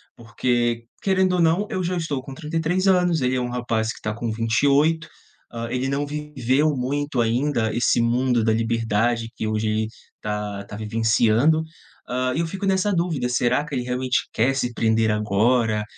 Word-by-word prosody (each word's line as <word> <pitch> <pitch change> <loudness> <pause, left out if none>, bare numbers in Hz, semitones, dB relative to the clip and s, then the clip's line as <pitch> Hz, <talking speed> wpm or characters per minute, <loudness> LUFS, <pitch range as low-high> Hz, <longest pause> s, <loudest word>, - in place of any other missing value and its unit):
Porque, 120 0 -1 0.2
querendo 190 -1 +2
ou 180 - +2
não 170 +6 +2
eu 190 -5 -2
já 180 +1 -1
estou 150 -6 -2
com 135 - -9
33 165 +5 -1
anos, 180 -4 +3
ele 130 0 +1
é 125 - 0
um 125 - -2
rapaz 115 -2 -1
que - - -10
está 110 - -3
com 115 0 -3
28. 140 +8 +2 0.4
Hã, 115 0 -5
ele 125 +1 -1
não 140 +1 -1
viveu 150 -1 0
muito 135 +1 -1
ainda 120 -1 0
esse 120 0 +2
mundo 120 +1 +2
da 110 - +2
liberdade, 115 0 0
que - - -4
hoje 110 0 -1
ele 110 0 0 0.3
tá 105 -1 -4
tá 100 - -9
vivenciando. 115 +7 +2 0.5
Hã, 130 +1 0
eu 165 +2 0
fico 195 +4 -5
nessa 195 +1 +2
dúvida, 170 -8 0
será 125 +3 +1
que 150 -2 -5
ele 125 - -1
realmente 125 0 -1
quer 130 +4 +2
se 125 -3 -1
prender 110 -1 +2
agora, 105 +1 +1
125 Hz, 175 wpm, -23 LUFS, 115-150 Hz, 0.5 s, anos